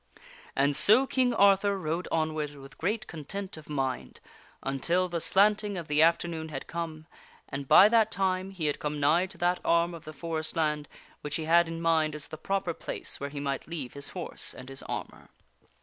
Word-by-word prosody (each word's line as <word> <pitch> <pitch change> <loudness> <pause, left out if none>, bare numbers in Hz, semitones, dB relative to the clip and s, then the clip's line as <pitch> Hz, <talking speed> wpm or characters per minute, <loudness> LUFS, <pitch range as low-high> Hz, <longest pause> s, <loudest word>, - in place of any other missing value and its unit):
And 140 +1 +2
so 220 - +7
King 255 -2 +1
Arthur 200 -2 +4
rode 170 0 -3
onward 155 -2 -1
with 135 -1 -13
great 215 +5 -1
content 185 +5 -6
of 155 -1 -13
mind 135 -3 -3 0.4
until 170 +7 0
the 170 -2 -3
slanting 205 +2 +3
of 170 -3 -6
the 150 0 +2
afternoon 165 -1 +2
had 135 -3 -6
come, 160 -2 -5 0.4
and 140 0 -6
by 200 - +9
that 220 -1 +4
time 190 -2 -1
he 185 -5 -5
had 145 - 0
come 150 0 -3
nigh 160 +6 +3
to 190 -1 -8
that 175 +1 +1
arm 170 +1 +2
of 165 - -10
the 155 - -7
forest 160 +2 -4
land 150 -2 0 0.3
which 150 - -3
he 160 - -2
had 170 +1 +5
in 165 0 -5
mind 160 -2 +2
as 150 - -6
the 155 - -7
proper 195 -1 -1
place - - -6
where 140 - -4
he 145 0 -6
might 140 -1 -3
leave 150 -7 -6
his 140 0 -5
horse 180 -3 -5
and 130 +1 -10
his 135 0 -3
armor. - - -6
165 Hz, 195 wpm, -28 LUFS, 150-185 Hz, 0.4 s, by